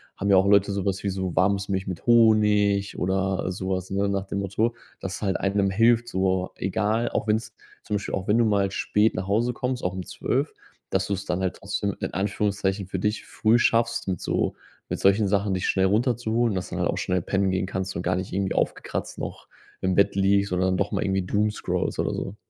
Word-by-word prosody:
haben 100 0 0
ja 95 - +7
auch 95 +1 +4
Leute 100 0 +4
sowas 100 0 -2
wie 100 - 0
so 95 -2 -3
warmes 100 +1 +2
Milch 95 0 -1
mit 95 +1 -6
Honig 105 -3 +4
oder 95 0 0
sowas, 95 0 -3
ne, 100 +1 +1
nach 100 -1 -1
dem 100 - -3
Motto, 105 +4 0 0.3
das 95 +1 -5
halt 95 -2 0
einem 100 0 +1
hilft, 115 +4 +3
so 95 -3 0
egal, 105 +5 0
auch - - -2
wenn's 110 0 0 0.3
zum 105 -2 -1
Beispiel 100 - -4
auch 95 - -5
wenn 105 +3 +3
du 115 - +4
mal 100 -2 +2
spät 105 +2 +1
nach 95 +1 -4
Hause 115 +5 +1
kommst, 125 +1 -3
auch 90 0 -1
um 95 - -4
12:00, - - -2 0.4
dass 95 0 0
du's 100 -1 -3
dann 90 +1 -1
halt 95 -1 -1
trotzdem 100 0 -3
in - - -4
Anführungszeichen 100 -1 -1
für 95 - -3
dich 105 +3 -1
früh 115 +2 +2
schaffst, 115 -2 +1
mit 90 -3 -2
so - - -1 0.3
mit - - -3
solchen 100 +2 +4
Sachen 100 0 +1
dich 95 - -1
schnell 95 -1 +2
runterzuholen, 115 0 +1
dass 90 - -3
du - - -6
dann - - -1
halt - - 0
auch - - -4
schnell 90 -1 0
pennen 95 +2 0
gehen 95 0 0
kannst 95 0 -3
und - - -2
gar 90 +1 +1
nicht 95 +1 -4
irgendwie 95 0 0
aufgekratzt - - -2
noch - - -7 0.3
im 95 -1 +1
Bett 100 - +3
liegst 100 0 +2
oder 90 0 +1
dann 95 0 +1
doch 100 +1 -1
mal - - 0
irgendwie 95 -2 0
doomscrollst 105 +2 -1
oder - - 0
so. 100 - -5
100 Hz, 220 wpm, -25 LUFS, 95-105 Hz, 0.4 s, ja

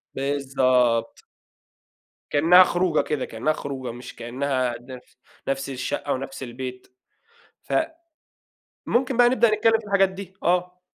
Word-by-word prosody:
بالضبط. 130 -4 +1 1.1
كإنّها 170 +5 +7
خروجة 175 -3 +1
كده، 150 -4 -2
كإنّها 125 +8 -1
خروجة، 130 -5 -5
مش 120 +1 -10
كإنّها 130 0 -2
نف 125 0 -12 0.3
نفس 135 0 -2
الشقّة 135 +2 -3
ونفس 135 +1 -6
البيت، 125 +1 -7 0.8
ف - - -6 1.1
ممكن 255 0 +1
بقى 245 0 +6
نبدأ 235 -3 +3
نتكلّم 225 +1 +3
في 220 - -14
الحاجات 200 -1 +3
دي، 190 0 -9
آه. 180 +1 0
140 Hz, 120 wpm, -24 LUFS, 130-185 Hz, 1.1 s, كإنّها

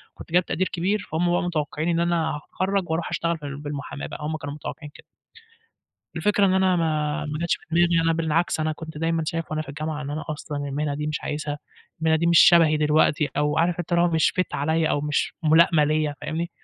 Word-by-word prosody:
كنت - - -12
جايب 180 0 +3
تقدير 185 +2 -1
كبير، 195 +4 -1
فهُم 175 +2 +1
بقى 175 - +1
متوقّعين 155 -1 -2
إن 170 0 +1
أنا 170 -2 0
هاتخرَّج 185 +4 -2
واروح 165 +1 -1
أشتغل 170 0 -1
فال 145 -2 -7
بالمُحاماة 145 -1 -6
بقى، - - -8
هم 155 +1 -2
كانوا 145 -1 -6
متوقّعين 150 0 -8
كده. - - -15 1.1
الفكرة 205 -1 +2
إن 185 - +2
أنا 190 -1 +3
ما 155 -3 -1
ما 150 0 -4
جاتش 170 +1 0
دماغي، 170 0 +3
أنا 165 0 +2
بالعكس 165 0 0
أنا 155 0 0
كنت 160 -1 -9
دايمًا 165 +1 0
شايف 165 +1 -3
وأنا 155 0 -1
في 155 - -15
الجامعة 150 +1 -4
إن 140 - -5
أنا 155 +2 -4
أصلًا 150 -1 -5
المهنة 145 +1 -2
دي 150 +1 -3
مش 150 0 -2
عايزها، 150 0 -3 0.4
المهنة 160 0 +3
دي 170 +2 0
مش 170 -1 +5
شبهي 165 -3 +6
دلوقتي 150 -1 +2
أو 150 +1 +1
عارف 170 +1 +1
أنت 175 - -6
اللي 170 0 +4
هو 175 - +3
مش 160 -1 +2
fit 185 - -3
عليّا 160 +2 +1
أو 145 - +1
مش 150 0 -1
مُلائمة 160 0 +5
ليّا 155 -1 0
فاهمني، 170 +3 -3
160 Hz, 215 wpm, -24 LUFS, 150-170 Hz, 1.1 s, شبهي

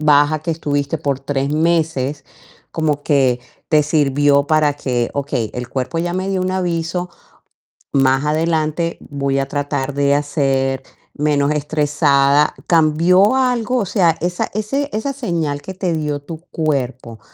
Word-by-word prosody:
baja 150 0 +4
que 165 - -3
estuviste 145 -2 -1
por 140 -3 -2
3 140 0 -2
meses 155 -4 0 0.5
como 150 -3 -1
que 135 -5 +2 0.3
te 155 -1 +4
sirvió 145 -1 +2
para 155 -1 +3
que: 125 -4 -1
"Okey, 135 -6 -2
el 125 -1 -5
cuerpo 130 +6 -3
ya 175 +1 -1
me 185 +1 -2
dio 190 -1 0
un 185 0 -1
aviso. 175 -1 -2 0.8
Más 135 0 +3
adelante 160 +1 0
voy 140 -1 -1
a 135 0 -1
tratar 145 -1 -2
de 140 0 +2
hacer 135 -2 0 0.3
menos 145 -1 +1
estresada". 150 -1 +2
¿Cambió 170 +7 +4
algo? 250 -1 +1
O 210 - -1
sea, 175 -4 +2
esa 175 +1 -2
ese 270 +7 -2
esa 220 +6 -2
señal 165 - -2
que 190 - -7
te 185 -2 -1
dio 150 -2 -2
tu 160 +2 -8
cuerpo, 130 -7 -2
150 Hz, 145 wpm, -18 LUFS, 140-170 Hz, 0.8 s, baja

